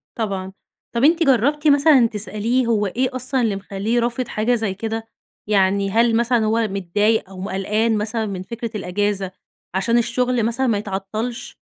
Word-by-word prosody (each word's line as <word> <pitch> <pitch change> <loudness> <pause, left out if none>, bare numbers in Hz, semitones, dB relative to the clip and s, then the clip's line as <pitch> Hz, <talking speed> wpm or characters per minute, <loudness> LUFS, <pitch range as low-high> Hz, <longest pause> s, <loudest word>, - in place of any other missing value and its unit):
طبعًا. 195 -4 -3 0.4
طب 235 +3 +1
أنتِ 330 +2 +4
جرّبتِ 285 +3 +2
مثلًا 285 -4 +6
تسأليه 220 +4 -1
هو 210 -3 +1
إيه 255 +7 0
أصلًا 255 +1 -1
اللي 220 -5 +1
مخلّيه 200 +4 -1
رافض 240 +1 -2
حاجة 220 +3 +1
زي 220 -4 -1
كده؟ 225 +2 -4 0.4
يعني 195 -1 +2
هل 230 +2 +3
مثلًا 235 -1 +2
هو 220 0 +1
متضايق 200 +2 0
أو 185 - -9
م 195 - -4
قلقان 215 +4 0
مثلًا 220 +1 -2
من 190 -3 -5
فكرة 235 +2 -6
الأجازة 200 0 -1 0.4
عشان 230 +5 +2
الشغل 245 0 0
مثلًا 250 +3 0
ما 220 -4 +1
يتعطّلش 210 +4 -5
225 Hz, 165 wpm, -21 LUFS, 200-240 Hz, 0.4 s, مثلًا